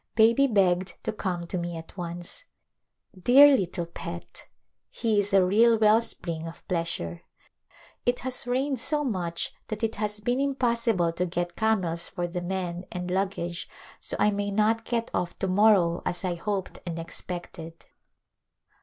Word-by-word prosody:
Baby 230 +5 +5
begged 185 -5 +2
to 220 - -2
come 180 -5 -3
to 180 +1 -3
me 170 -1 -4
at 165 - -11
once. 175 - -6 0.7
Dear 270 +9 +7
little 180 -5 -2
pet! 170 0 -8 0.4
he 220 -3 +1
is 205 0 0
a 195 -2 +5
real 225 +5 +5
well 215 +1 +5
spring 165 -7 -4
of 165 - -11
pleasure. 165 - -2 0.8
It 245 0 +1
has 255 -1 -2
rained 265 +1 0
so 295 +4 0
much 180 -9 -2
that 215 +1 -5
it 225 0 -1
has 210 0 -1
been 245 +5 0
impossible 235 -10 +1
to 180 +2 -1
get 175 0 -3
camels 185 -7 0
for 175 - -3
the 175 +1 -4
men 180 -1 -3
and 180 0 -4
luggage 185 -2 -2 0.3
so - - -1
I 210 - +3
may 205 0 -2
not 215 +2 +1
get 230 -1 -2
off 175 -1 -2
to 190 - -1
morrow 185 -3 +4
as 175 +2 -3
I 180 - 0
hoped 190 +2 -3
and 170 -2 -5
expected. 165 -1 -7
190 Hz, 160 wpm, -27 LUFS, 175-225 Hz, 0.8 s, Dear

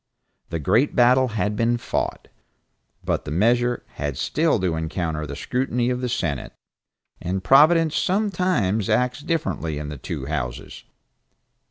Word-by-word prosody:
The 85 - -2
great 110 - +2
battle 125 +1 +5
had 105 -2 -1
been 115 +2 +1
fought, - - -3 0.8
but - - -1
the - - -7
measure 120 +8 +1 0.2
had 70 -2 -2
still 155 -6 +1
to 90 -3 0
encounter 80 -1 -3
the 70 - -6
scrutiny 125 - -1
of 125 0 -2
the 125 - -2
Senate, 75 - -2 0.7
and 95 +2 -3
Providence 155 - +5
sometimes 180 - 0
acts 125 +3 +1
differently 150 - -2
in 75 0 -5
the 75 -3 -7
two 65 - -5
Houses. 65 -5 -5
115 Hz, 140 wpm, -23 LUFS, 80-130 Hz, 0.8 s, battle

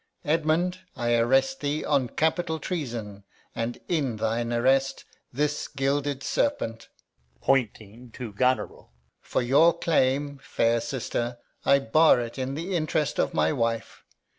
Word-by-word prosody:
Edmund, 165 +4 +1 0.2
I 120 -3 0
arrest 135 - +2
thee 145 +2 -2
On 140 -4 +2
capital 160 +2 0
treason; 120 - -5 0.3
and, 115 +1 -3
in 140 -9 0
thine 115 +2 -1
attaint, 135 +3 +2 0.3
This 150 +3 -1
gilded 140 0 -1
serpent 115 - -1 0.5
[points 125 - +2 0.4
to 120 -5 -7
Goneril]. 130 +5 0 0.3
For - - -2
your 150 +8 +4
claim, 140 -3 +1
fair 115 -3 +1
sister, 120 -2 -3 0.3
I 140 - +6
bar 140 +3 +4
it 120 +2 -5
in 130 +1 -2
the 175 +5 -3
interest 155 -2 0
of - - 0
my 80 0 +2
wife. 115 -1 -2
135 Hz, 130 wpm, -26 LUFS, 120-155 Hz, 0.5 s, I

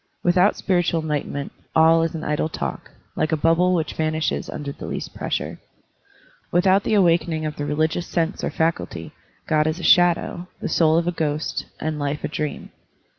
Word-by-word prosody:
Without 180 +3 +4
spiritual 175 -3 +1
enlightenment, 145 -2 -3 0.2
all 160 +1 +6
is 165 0 -1
an 160 - -5
idle 150 +1 -1
talk, 70 - -5 0.3
like 155 - 0
a 160 - +2
bubble 165 +4 +3
which 160 -3 -1
vanishes 155 0 -1
under 145 -1 -5
the - - -8
least - - -5
pressure. - - -3 0.9
Without 190 +3 +4
the 215 - +1
awakening 170 -4 +2
of 150 -1 -3
the 145 - -3
religious 155 +3 0
sense 165 +2 -1
or - - 0
faculty, 160 - -2 0.4
Grod 155 0 +2
is 155 +3 -1
a - - -7
shadow, 175 0 +3
the - - -3
soul 160 -1 +3
a 170 +1 +1
ghost, 155 -2 -2
and 155 -1 -3
life 145 +1 -2
a - - 0
dream. 150 0 -4
160 Hz, 175 wpm, -22 LUFS, 155-175 Hz, 0.9 s, all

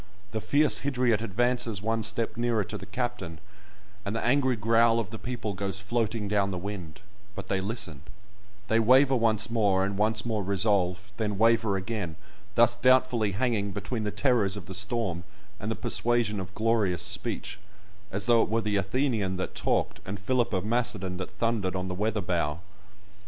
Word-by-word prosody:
The 110 -2 -3
fierce 145 +7 +3
Hydriot 125 -5 +1
advances 120 0 0
one 115 +2 -1
step 110 +1 -2
nearer 120 -2 +1
to - - -7
the - - -7
captain, 100 -7 -4 0.7
and 100 +2 -3
the 115 - -2
angry 130 0 +3
growl 115 +2 +3
of 105 -3 -4
the 110 - -7
people 120 -4 -4
goes 95 0 -3
floating 110 +1 -1
down 100 -1 +1
the 95 - -3
wind, 90 -4 -6 0.3
but - - -7
they 95 -1 0
listen; 95 - -3 0.7
they 110 - +3
waver 130 +4 +5
once 110 -2 +2
more, 100 -4 +2
and 100 0 -3
once 110 +1 +2
more 110 -3 -1
resolve, 100 -1 0
then 105 -3 -1
waver 115 -2 +3
again, 95 -4 -4 0.4
thus 120 0 +5
doubtfully 125 -4 +3
hanging 105 -3 0
between 110 +2 -3
the 105 - -1
terrors 105 -3 +1
of 95 - -8
the 95 - -8
storm 100 -3 -1 0.4
and 110 0 -4
the 110 - -1
persuasion 120 -2 0
of 95 +1 -7
glorious 110 -6 +1
speech, 95 +2 -2 0.5
as 100 +1 0
though 120 -1 +5
it - - 0
were 115 +1 +1
the 105 -1 0
Athenian 100 -2 0
that 95 - -4
talked, - - 0
and 95 +1 -6
Philip 120 +3 0
of 95 -2 -1
Macedon 105 -5 -1
that 95 - -5
thundered 110 -5 -1
on 95 0 -3
the - - -3
weather 105 +3 -1
bow. 85 -3 -1
110 Hz, 180 wpm, -28 LUFS, 95-115 Hz, 0.7 s, waver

